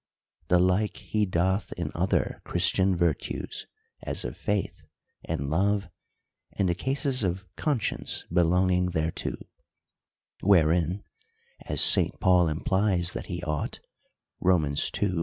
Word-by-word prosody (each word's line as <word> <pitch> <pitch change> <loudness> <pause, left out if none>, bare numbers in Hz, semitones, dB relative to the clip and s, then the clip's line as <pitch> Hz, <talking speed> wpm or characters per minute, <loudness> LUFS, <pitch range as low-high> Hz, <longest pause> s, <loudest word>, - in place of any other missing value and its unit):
The 90 - +4
like 95 +4 +1
he 105 -1 -1
doth 95 +3 0
in - - -4
other - - -1
Christian 95 0 +2
virtues, 85 -4 -2 0.3
as - - -4
of - - -5
faith, 105 -1 -3 0.4
and 70 +1 -3
love, 100 +2 +1 0.6
and 95 - 0
the 85 - +2
cases 130 +6 -1
of 95 0 -2
conscience 140 -8 -1
belonging 90 +1 +3
thereto; 80 +1 -2 1.1
wherein 90 0 +3 0.6
(as - - +1
St. - - +5
Paul 90 -2 +4
implies 95 +3 +1
that - - -6
he 85 -1 -5
ought, 75 -2 -3 0.6
Rom. 90 -4 +3 0.4
ii.) 100 - +1
90 Hz, 120 wpm, -27 LUFS, 85-100 Hz, 1.1 s, St